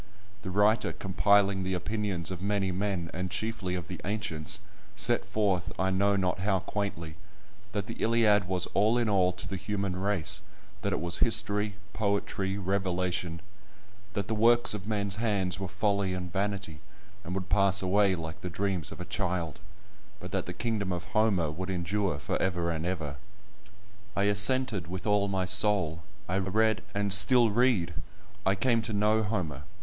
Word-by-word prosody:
The 95 - -6
writer 105 +3 +2
compiling 100 0 +2
the 95 0 -1
opinions 95 -3 -2
of 90 -1 -6
many 100 -1 0
men, 90 -3 -2
and 90 +2 -3
chiefly 105 -3 -3
of 85 -4 -5
the 90 - -7
ancients, 100 -7 -1 0.4
set - - +4
forth, 100 -4 0
I 95 0 +1
know 100 +2 +2
not 95 -2 0
how 95 +1 +1
quaintly, 85 -7 -4 0.6
that 100 -1 -2
the 115 - -6
Iliad 110 -4 +3
was 90 0 0
all 110 +4 +3
in 120 -2 +1
all 95 -3 +3
to 90 - -8
the 95 - -3
human 100 -1 -3
race—that 95 -3 -2
it - - -1
was 85 0 -2
history, 105 0 +2 0.2
poetry, 100 -2 -1
revelation; 90 -3 -1 0.7
that 100 -2 -2
the - - -1
works 120 +2 +4
of 105 -2 -6
men's 100 -2 -1
hands 100 -5 -1
were 95 - -3
folly 100 0 0
and 90 -2 -6
vanity, 100 -5 -3 0.4
and 90 0 -5
would 95 0 -4
pass 100 -1 +4
away 95 +1 +3
like 80 -1 -7
the 90 - -4
dreams 95 -2 -2
of - - -9
a - - -5
child, 85 -5 -2 0.6
but - - -8
that - - -2
the - - -3
kingdom 105 0 -2
of 90 -1 -3
Homer 100 -8 +2
would 90 +4 -5
endure 90 -1 -1
for - - -3
ever 85 -2 0
and 80 +1 -3
ever. 80 -6 -3 1.0
I 100 - +1
assented 100 0 +4
with 90 +1 -6
all 105 -1 +2
my 95 -2 -1
soul. 90 -4 +2 0.3
I 95 +2 0
read, 110 +4 +1
and 100 -1 +2
still 110 +3 +7
read; 105 -7 +2 0.5
I 95 - +3
came 115 +3 +2
to 110 0 -4
know 105 +2 +2
Homer. 90 - -3
95 Hz, 170 wpm, -29 LUFS, 90-105 Hz, 1.0 s, still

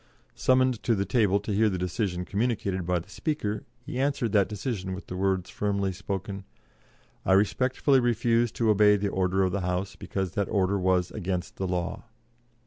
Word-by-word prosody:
Summoned 130 -3 +2
to 115 - +2
the 100 -1 0
table 100 -1 +2
to 105 0 -3
hear 110 +2 +3
the 95 - -2
decision 90 0 -2
communicated 100 -4 -1
by 90 0 +2
the 85 - -6
Speaker, 105 -3 -3 0.2
he 125 - -4
answered 135 -5 0
that 100 -2 +3
decision 105 -3 -3
with 95 - -9
the 90 - -6
words 95 -1 0
firmly 100 -2 -1
spoken: 95 +1 -5 0.8
"I - - +3
respectfully 130 +7 +3
refuse 120 -1 +2
to 115 -2 +2
obey 105 0 +5
the 100 0 -1
order 95 0 +1
of 95 - +1
the 100 - -1
House, 90 +2 -2
because 95 -3 -3
that 100 +1 -1
order 100 -1 +1
was 90 -1 +1
against 90 -3 -4
the 95 - -2
law." 90 +2 -3
100 Hz, 180 wpm, -27 LUFS, 95-110 Hz, 0.8 s, obey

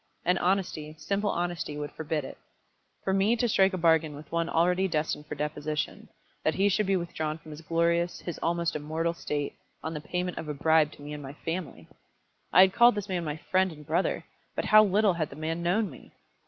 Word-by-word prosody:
And 180 +2 +3
honesty, 175 -5 -1
simple 200 +4 -1
honesty, 175 -4 -2
would 145 0 -4
forbid 155 -2 -3
it. - - -9 0.6
For 190 - 0
me 195 +4 +3
to 240 +1 +1
strike 195 -3 +4
a - - -1
bargain 160 -3 +3
with 150 0 -12
one 170 0 0
already 180 +3 +2
destined 155 -3 -2
for - - -5
deposition, 150 0 -3 0.3
that 155 - +1
he 200 +1 +3
should 205 +1 +1
be 195 - +3
withdrawn 160 -3 -2
from 155 -1 -13
his 150 +1 -9
glorious, 170 +2 +1
his 175 - -6
almost 170 0 0
immortal 160 +3 -1
state, 145 -3 -3 0.3
on 160 - -3
the 150 - -5
payment 180 +3 -3
of 160 - -6
a 150 - -3
bribe 160 +1 +3
to 145 - -13
me 150 +1 -6
and 150 - -6
my 135 0 -8
family! 165 -3 -4 0.6
I 185 - +8
had 190 0 +6
called 240 -1 +6
this 205 -2 -4
man 180 -2 -1
my 150 -1 -3
friend 185 0 +3
and 150 -2 -12
brother, 165 +5 0 0.3
but - - -1
how 215 0 +8
little 205 0 +3
had 160 -3 -2
the - - -10
man 160 +2 -3
known 190 +5 +1
me! - - -14
170 Hz, 215 wpm, -28 LUFS, 155-185 Hz, 0.6 s, I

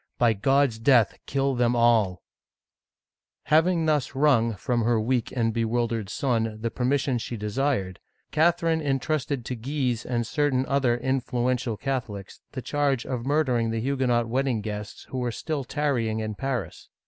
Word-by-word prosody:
By 120 -2 +4
God's 135 +2 +2
death, 120 -2 +3
kill 135 0 0
them 120 -1 +2
all! 115 -6 +3 0.6
" - - -67
Having 165 +1 +4
thus 150 -4 0
wrung 125 -6 +3
from 120 +4 -1
her 115 0 +2
weak 120 +1 0
and 115 -3 0
bewildered 115 -2 -1
son 115 -4 -1
the 115 +1 -2
permission 130 0 0
she 120 +1 -5
desired, 105 -3 -1 0.3
Catherine 165 0 +2
intrusted 140 -2 -1
to 125 - -3
Guise 125 -1 -2
and 120 -1 -1
certahi 135 +1 0
other 130 -4 +2
influential 125 -2 -1
Catholics, 110 -8 -4
the 130 - -5
charge 140 -4 0
of 125 -1 -4
mur 150 +2 +3
dering 120 -5 0
the 115 0 -1
Huguenot 125 -2 +1
wedding 125 -1 0
guests 105 0 -6
who 130 - -2
were 125 -1 -1
still 150 +3 -3
tarry 140 -5 0
ing 110 0 -2
in 110 -1 -3
Paris. 125 -5 -4
125 Hz, 160 wpm, -26 LUFS, 115-140 Hz, 0.6 s, By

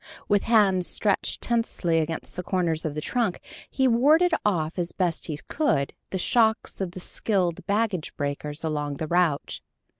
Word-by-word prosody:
With 205 -1 +3
hands 200 -6 +3
stretched 205 -3 0
tensely 225 -8 +1
against 160 0 -4
the 180 - -3
corners 170 -4 -1
of 150 -2 -3
the 150 - -3
trunk, 225 0 -1 0.3
he 265 -1 +1
warded 305 +9 +4
off 170 -4 0
as 175 0 -1
best 175 -4 -1
he 155 -3 -3
could 155 - 0 0.2
the 190 - -2
shocks 220 +2 +1
of 180 -2 -3
the 185 - -7
skilled 180 -2 -1
baggage 205 -5 -1
breakers 145 +2 -3
along 150 -2 -2
the 160 - -4
route. 170 -3 0
180 Hz, 160 wpm, -25 LUFS, 160-220 Hz, 0.3 s, warded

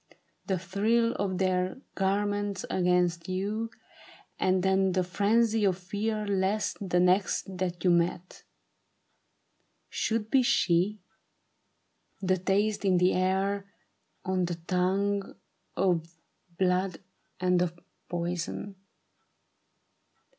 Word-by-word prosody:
The 190 -3 +1
thrill 215 +6 +1
of 190 -2 -1
their 185 +1 0 0.2
garments 205 0 -1
against 180 -1 +1
you: 205 +5 -2 0.7
and 185 -1 +2
then 190 0 +2
The 185 0 +2
frenzy 215 +4 +2
of 190 -3 +2
fear 210 +4 -2
lest 200 +1 0
the 180 - +3
next 185 +1 +2
that 175 -2 -2
you 180 - +4
met 175 +1 0 1.5
Should 220 -1 -1
be 265 - +5
she; 190 -3 +2 1.2
the 185 -1 +1
taste 200 +4 +1
in 190 -2 +3
the 180 +1 +3
air, 195 +2 0 0.5
on 185 -1 +1
the 175 0 -3
tongue, 190 +4 -1 0.4
Of 170 -3 +1 0.5
blood 185 -1 +1 0.4
and 180 -1 +2
of 175 -1 -2 0.3
poison. 175 +3 -3
190 Hz, 105 wpm, -28 LUFS, 180-200 Hz, 1.5 s, be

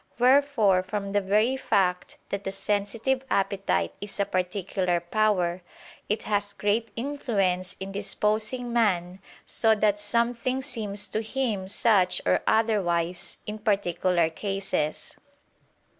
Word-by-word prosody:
Wherefore 250 -7 +4
from 200 +1 -4
the 205 0 +2
very 215 +6 +2
fact 180 -8 0
that 200 0 -3
the 195 - -3
sensitive 210 +6 -1
appetite 195 - 0
is 205 0 -6
a 200 - +3
particular 185 -1 -1
power, 180 -1 +1 0.5
it 210 +1 -1
has 205 -1 0
great 215 +3 0
influence 205 -9 -1
in 195 +1 -5
disposing 215 +4 -1
man 185 -6 +1 0.3
so 220 -1 +3
that 210 -1 +2
something 235 +4 0
seems 210 -7 -3
to 220 - -1
him 220 -4 -2
such 190 -3 +3
or 90 0 +3
otherwise, 180 -6 +1
in 210 +1 -5
particular 185 -5 +1
cases. 195 -4 -3
205 Hz, 120 wpm, -26 LUFS, 185-220 Hz, 0.5 s, Wherefore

